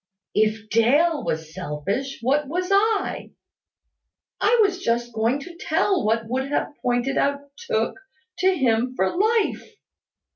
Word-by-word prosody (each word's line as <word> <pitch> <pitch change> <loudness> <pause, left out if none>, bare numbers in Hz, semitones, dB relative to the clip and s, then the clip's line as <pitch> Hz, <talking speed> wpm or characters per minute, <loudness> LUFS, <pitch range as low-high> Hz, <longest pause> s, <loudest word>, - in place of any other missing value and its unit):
If 215 0 +1
Dale 290 +8 +3
was 160 0 -3
selfish, 190 - -4
what 280 +4 +1
was 360 +5 -2
I? 410 +1 +1 1.1
I 450 +4 +3
was 375 -2 0
just 240 -4 -1
going 225 +4 +1
to 340 +4 -10
tell 355 +3 +1
what 225 +1 0
would 260 +3 -2
have 290 +1 -2
pointed 245 +2 0
out 280 0 -2
Tooke 455 -4 0 0.4
to 370 - +4
him 255 -6 +1
for 190 -3 0
life. 440 +2 0
275 Hz, 135 wpm, -23 LUFS, 225-360 Hz, 1.1 s, to